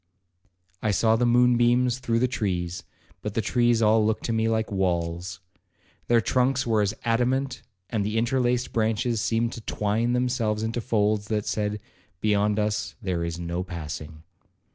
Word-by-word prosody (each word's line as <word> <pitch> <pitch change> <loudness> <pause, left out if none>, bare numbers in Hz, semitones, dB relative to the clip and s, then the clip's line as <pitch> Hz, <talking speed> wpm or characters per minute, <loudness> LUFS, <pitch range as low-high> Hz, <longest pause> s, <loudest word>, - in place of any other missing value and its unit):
I 110 - 0
saw 110 +3 +3
the 120 +1 +2
moon 120 0 +4
beams 120 +1 +3
through 120 -2 0
the 125 +2 +2
trees, 90 -7 -2 0.4
but 105 -1 -5
the - - +1
trees 120 +1 +2
all 110 0 +4
looked 110 +1 0
to 115 - -1
me 110 0 +1
like 110 -1 -1
walls. 90 -1 -2 0.7
Their 120 -1 +4
trunks 130 +3 +1
were 110 -2 +2
as 105 +1 0
adamant, 125 +3 0 0.3
and 105 -1 -1
the 105 +2 -2
interlaced 125 +1 +1
branches 110 +1 0
seemed 115 +1 0
to 115 - -8
twine 110 +3 0
themselves 120 -4 0
into 115 +2 -2
folds 105 -1 +1
that 105 -2 -1
said, 105 0 -1 0.4
'Beyond 105 0 +1
us 105 0 -1
there 90 -6 -2
is 85 0 -3
no 85 +1 -3
passing.' 80 -3 -7
110 Hz, 165 wpm, -25 LUFS, 100-120 Hz, 0.7 s, moon